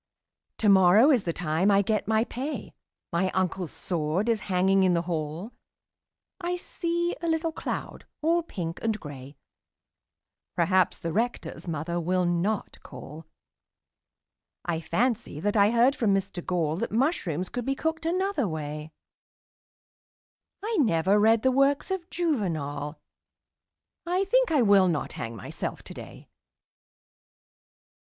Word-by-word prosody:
Tomorrow 200 +5 +6
is 245 -8 +2
the 170 - 0
time 165 +3 0
I 200 0 +4
get 215 +1 -1
my 220 0 +3
pay 265 +6 -5 0.4
My 180 +2 +2
uncle's 185 -2 -1
sword 175 +5 -1
is 225 -2 +2
hanging 190 +1 +3
in 185 -2 +4
the 170 - 0
hall 165 +4 -4 0.9
I 355 0 -2
see 345 0 -2
a 340 - -2
little 325 0 0
cloud - - -5 0.2
all 335 +2 +3
pink 175 - -5
and 220 -1 -1
grey 140 -1 -10 1.2
Perhaps 185 +1 +2
the 165 -1 -4
Rector's 235 -3 -2
mother 165 +2 -2
will 180 +2 +1
not 175 +5 -1
call 155 +2 -10 1.4
I 165 -2 -1
fancy 215 - -1
that 205 +6 -1
I 205 -1 +5
heard 240 +4 +4
from 205 -4 +2
Mr 195 -2 -3
Gall 165 -3 0
That 230 - -3
mushrooms 205 - 0
could 245 0 -4
be 270 - 0
cooked 320 +2 -2
another 365 - 0
way 155 -1 -5 1.7
I 445 0 -1
never 195 - +3
read 220 +1 +4
the 260 - +4
works 275 +6 +2
of 370 -2 -3
Juvenal 160 - -2 1.1
I 365 +2 +1
think - - +3
I 290 -6 +4
will 200 -3 +5
not 165 -4 -1
hang 115 0 -5
myself 105 - -6
today. - - -10
195 Hz, 130 wpm, -27 LUFS, 170-265 Hz, 1.7 s, Tomorrow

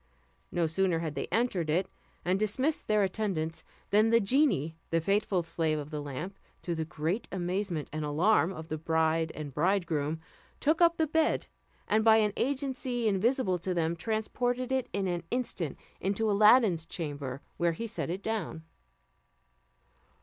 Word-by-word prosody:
No 175 -1 +1
sooner 175 +2 +1
had 165 -2 -3
they - - -3
entered 200 -9 0
it, 180 +5 +2 0.4
and 185 +2 +2
dismissed 260 +9 0
their 215 -1 +3
attendants, 185 -5 -2 0.3
than 215 +2 +5
the 230 0 +5
genie, 200 - +2
the 165 - +2
faithful 195 +1 +1
slave 160 -1 0
of 150 +1 -6
the 150 -1 -3
lamp, 150 +8 -6 0.2
to 175 - -2
the 160 -1 -2
great 165 +6 -2
amazement 180 -3 -2
and 155 0 -2
alarm 160 +3 +3
of 160 -3 -7
the 155 - -3
bride 160 0 +1
and 150 -3 -6
bridegroom, 160 -3 0 0.4
took 315 +3 +2
up 340 0 +5
the 320 - +3
bed, 315 +1 +1 0.4
and 215 +1 +3
by 220 0 +7
an 210 -2 +2
agency 260 -3 -1
invisible 205 -1 +1
to 185 +1 -2
them, 165 0 +1
transported 245 +6 -1
it 260 -2 0
in 195 -1 -1
an 175 -1 -1
instant 230 - -2 0.2
into 205 +3 0
Aladdin's 205 -5 +5
chamber, 145 -5 -5
where 170 -1 +2
he 230 +8 -5
set 225 -6 -4
it 185 +3 -4
down. 205 -7 -3
185 Hz, 160 wpm, -30 LUFS, 160-220 Hz, 0.4 s, by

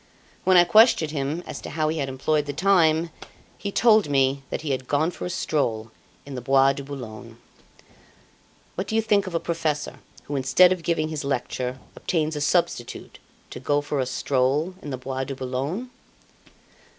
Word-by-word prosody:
When 185 0 +6
I 175 - +8
questioned 215 -6 +5
him 150 +3 -3
as - - -7
to - - -7
how 155 +1 -1
he 160 0 -2
had 135 -2 -2
employeeed 145 +3 0
the 145 - -3
time, 165 -1 +3 0.4
he 200 - -5
told 215 -5 +4
me 135 0 +2
that - - -3
he 155 -2 -3
had 130 -1 -3
gone 155 +4 +1
for - - -7
a - - -5
stroll 115 -11 -1 0.3
in 140 - -8
the 125 - -5
Bois 135 +2 +4
de 140 - -6
Boulogne. 120 -4 -9 1.4
What 190 +2 -4
do 220 - -3
you 225 - +4
think 205 -2 +2
of 180 - -5
a - - +2
professor 160 -3 -2 0.2
who, 145 - -5
instead 140 +7 +5
of 185 -2 -1
giving 165 -2 0
his 155 -2 -4
lecture, 130 -1 -2 0.2
obtains 160 -2 -1
a 150 - -3
substitute 145 -6 -1 0.3
to - - -7
go 145 +3 +1
for 145 0 -3
a 130 - 0
stroll 135 +7 0
in 150 - -7
the 130 - -3
Bois 130 +1 -4
de 135 - -5
Boulogne? 135 - -4
145 Hz, 185 wpm, -24 LUFS, 135-170 Hz, 1.4 s, I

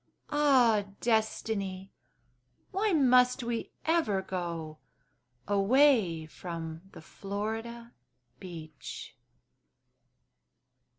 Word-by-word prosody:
Ah, 255 -8 +4
Destiny! 210 -4 -1 0.8
Why 410 +3 +1
must 255 -4 +4
we 235 -1 -3 0.2
ever 315 - +1
go 170 -5 -5 0.7
Away 205 - +3
from 160 +2 -7
the - - -11
Florida 225 +6 -5 0.5
beach? 160 -5 -9
210 Hz, 65 wpm, -30 LUFS, 175-245 Hz, 0.8 s, Ah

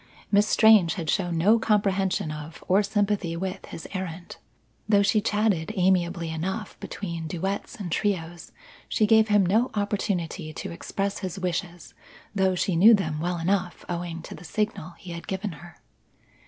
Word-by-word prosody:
Miss 205 +1 +4
Strange 215 -7 +5
had 165 -4 -2
shown 175 -4 0
no 210 +8 +4
comprehension 195 -6 +1
of 155 +1 -8
or 190 +3 +4
sympathy 200 -4 0
with 185 +1 -4
his 165 - -8
errand. 180 -2 -6 0.5
Though 200 -1 +5
she 210 +1 +3
chatted 210 -5 +1
amiably 175 -3 +1
enough 190 +6 -4
between 170 -5 -5
duets 190 +5 -3
and 185 -5 -6
trios, 175 -4 -2 0.4
she 215 - +2
gave 220 +1 +5
him 205 -2 +4
no 220 +8 +2
opportunity 195 -5 -2
to - - -6
express 195 +3 -3
his 190 -1 -5
wishes 175 -2 -4 0.4
though 190 -2 +2
she 180 0 0
knew 215 +7 +8
them 175 -6 -2
well 175 +2 -1
enough, 180 +1 -1
owing 170 -1 -4
to - - -8
the - - -11
signal 180 -2 -3
he 180 - -10
had 170 0 -7
given 190 +1 -3
her. 175 +2 -12
185 Hz, 160 wpm, -26 LUFS, 170-205 Hz, 0.5 s, knew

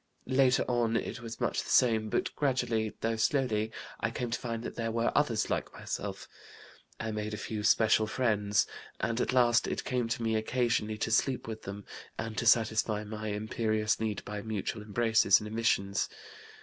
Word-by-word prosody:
Later 130 0 +3
on 120 -2 +1
it 115 - -4
was 115 0 -7
much - - 0
the - - -9
same, 110 -3 +3
but 185 - -1
gradually, 125 -6 0
though 115 0 0
slowly, 110 -3 +1 0.3
I - - 0
came 120 -2 -4
to 120 - -1
find 115 -1 -4
that - - -5
there 115 -1 -2
were 115 +1 +1
others 120 -7 +1
like - - -1
myself. - - -5 0.7
I 110 0 -3
made 105 0 -3
a - - -6
few 105 0 -4
special 110 +1 +4
friends, 105 -4 +1 0.3
and 115 +2 0
at - - 0
last 120 -2 +4
it - - -2
came 125 -2 -1
to 115 0 -2
me 110 -1 +1
occasionally 110 -1 0
to 110 - -2
sleep 125 +2 +1
with 110 -1 -5
them 100 +1 -7 0.3
and 110 -1 -4
to 120 - -1
satisfy 110 -2 +3
my 110 0 -6
imperious 110 +1 0
need 110 -2 -2
by 105 0 -5
mutual 110 0 -3
embraces 110 -1 +4
and 105 - -7
emissions. 105 -3 0
110 Hz, 180 wpm, -30 LUFS, 110-120 Hz, 0.7 s, special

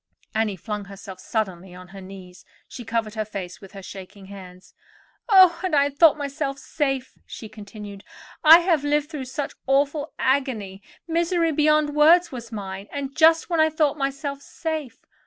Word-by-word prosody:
Annie 220 -2 0
flung 210 +2 -6
herself 195 -1 -11
suddenly 190 -5 -4
on 180 0 -12
her 195 +1 -11
knees; 185 -1 -12 0.2
she 245 - -9
covered 225 -1 -2
her 220 -1 -2
face 195 -4 -8
with 195 +1 -14
her 195 -1 -10
shaking 195 +1 -11
hands. 185 -2 -13 0.6
"Oh! 370 -4 +7
and 365 -5 0
I 285 0 +3
thought 305 +2 +5
myself 280 -1 -3
safe," 270 -1 -3
she 220 - -9
continued. 205 -1 -10 0.4
"I 325 +2 +9
have 335 -5 +1
lived 295 +1 0
through 285 -5 -5
such 270 +3 -5
awful 285 +3 +1
agony—misery 280 - -1
beyond 305 0 +2
words 330 +4 +5
was 235 -3 -8
mine; 195 -2 -6
and 275 -1 -5
just 325 +2 +4
when 335 - +1
I 315 0 +5
thought 305 -2 +1
myself 280 0 -3
safe. 310 -4 -6
270 Hz, 160 wpm, -23 LUFS, 200-305 Hz, 0.6 s, I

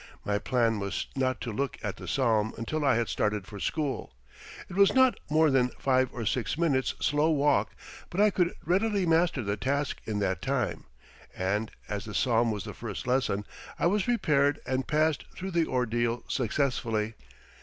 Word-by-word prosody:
My 105 0 0
plan 115 -3 +1
was 100 0 -2
not 130 -1 0
to 120 - -3
look 135 +4 -2
at 105 -2 -3
the 90 - -9
psalm 110 -1 +1
until 150 +7 -2
I 135 -4 +4
had 115 0 +1
started 105 -2 -1
for 100 +1 -9
school. 145 - -2 0.6
It - - -9
was 200 +4 +5
not 260 -1 +5
more 155 0 +4
than 125 -2 +3
five 130 -1 +2
or 115 - -5
six 115 +3 -1
minutes' 145 -6 +1
slow 150 +2 +2
walk, 150 -2 +2 0.3
but 175 - -4
I 210 0 +5
could 180 -2 +1
readily 195 +3 +2
master 165 -5 +2
the 100 0 -2
task 140 +5 -1
in 110 -2 -2
that 95 -3 -1
time, 130 -3 -1 0.5
and, 105 +4 0 0.2
as 100 -2 -4
the 105 -2 -7
psalm 120 -2 +2
was 105 -4 -2
the - - -7
first - - -6
lesson, 125 -5 0 0.3
I - - 0
was 200 +4 +3
prepared 145 - +2
and 130 0 -1
passed 155 0 +1
through 190 +1 -5
the 170 -2 +1
ordeal 120 -1 0
successfully. 115 -3 0
130 Hz, 180 wpm, -28 LUFS, 110-155 Hz, 0.6 s, was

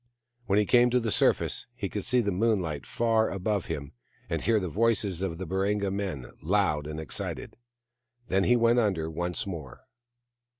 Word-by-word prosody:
WTien 100 - +4
he 105 - +4
came 120 +3 +5
to 125 +1 +3
the 115 -2 -2
surface - - +1
he 105 -5 -3
could 105 0 -4
see 125 -1 +2
the 100 -3 0
moonlight 90 -7 0
far 115 -1 +2
above 100 0 -1
him, 70 -1 -4 0.4
and - - 0
hear 115 -2 +3
the 95 - -3
voices 100 -1 0
of 90 -4 -2
the 95 - -5
Baringa 100 +2 0
men, 95 -10 -3 0.2
loud 80 -5 +1
and 75 0 -5
excited. 80 - -5 0.7
Then 95 +1 +2
he 125 - +5
went 120 0 +4
under 90 -8 0
once 85 +2 -2
more. 80 -10 -7
100 Hz, 175 wpm, -28 LUFS, 85-110 Hz, 0.7 s, came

